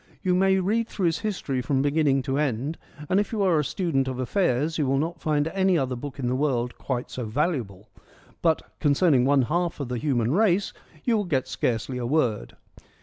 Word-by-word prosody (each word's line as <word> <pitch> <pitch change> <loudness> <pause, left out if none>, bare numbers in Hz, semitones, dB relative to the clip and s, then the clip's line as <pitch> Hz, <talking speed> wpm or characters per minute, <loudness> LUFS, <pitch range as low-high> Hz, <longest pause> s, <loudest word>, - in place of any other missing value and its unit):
You 185 - +2
may 190 +1 +3
read 220 +5 0
through 195 - -2
his 165 -1 +1
History 180 - -2
from 135 +1 0
beginning 145 -2 +2
to 135 +1 -1
end 140 +2 -1
— 150 0 -12
and 190 - +3
if 205 - -1
you 215 -3 0
are 175 -5 +3
a - - +1
student 145 -5 -1
of 130 -1 -3
affairs 155 +2 0
you 145 - +1
will 135 +1 +2
not 165 +4 -2
find 150 -1 +1
any 190 0 +2
other 130 -3 -1
book 135 +2 -7
in 135 - -3
the 125 - 0
world 125 -4 0
quite 125 -2 -3
so 125 - -4
valuable 110 - -2 0.3
— - - -28
but, 160 -2 +2 0.2
concerning 145 -3 +3
one 140 -1 +4
half 170 +5 -1
of 140 -4 -4
the 125 -1 -2
human 125 -5 0
race, 195 +2 +2 0.3
you 235 - +2
will 205 - -1
get 140 -7 0
scarcely 120 +2 -2
a 120 - -2
word. 125 -7 0
145 Hz, 215 wpm, -25 LUFS, 130-175 Hz, 0.3 s, one